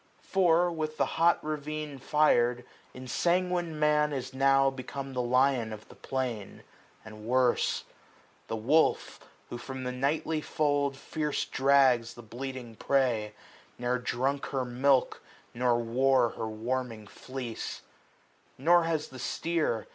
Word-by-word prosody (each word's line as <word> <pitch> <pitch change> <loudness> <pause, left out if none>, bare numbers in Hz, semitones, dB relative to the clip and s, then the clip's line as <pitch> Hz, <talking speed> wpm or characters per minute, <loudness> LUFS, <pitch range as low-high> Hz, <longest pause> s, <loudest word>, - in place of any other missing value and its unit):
For, 175 -2 +3
with 155 -2 -4
hot 170 +1 +3
ravine 150 -1 -4
fir'd, 125 -5 +2 0.3
ensanguined 170 +5 -1
Man 150 0 +3
Is 130 -2 -4
now 135 0 +4
become 135 +1 -7
the 125 - -1
lion 125 -1 +2
of 110 -1 -9
the - - -14
plain, 125 -6 -4 0.4
340 - - -27
And 110 -1 -11
worse. 125 +1 +2 0.6
The 115 - -3
wolf, 135 +9 +2 0.3
who 120 - -5
from 130 +1 -7
the 125 - -2
nightly 150 +4 -1
fold 145 -3 0
Fierce 150 +1 -2
drags 130 -4 +3
the 120 - -11
bleating 120 0 -7
prey, 120 -6 +1 0.4
ne'er 125 +1 -1
drunk 130 +3 -1
her 130 -2 -2
milk 130 +2 +2 0.3
Nor 120 0 +2
wore 125 +1 +2
her 110 - -5
warming 115 0 -3
fleece: 125 +2 -7 0.7
Nor 170 +5 +4
has 160 -2 -1
the 130 - -11
steer. 155 -4 -1
130 Hz, 130 wpm, -29 LUFS, 120-150 Hz, 0.7 s, now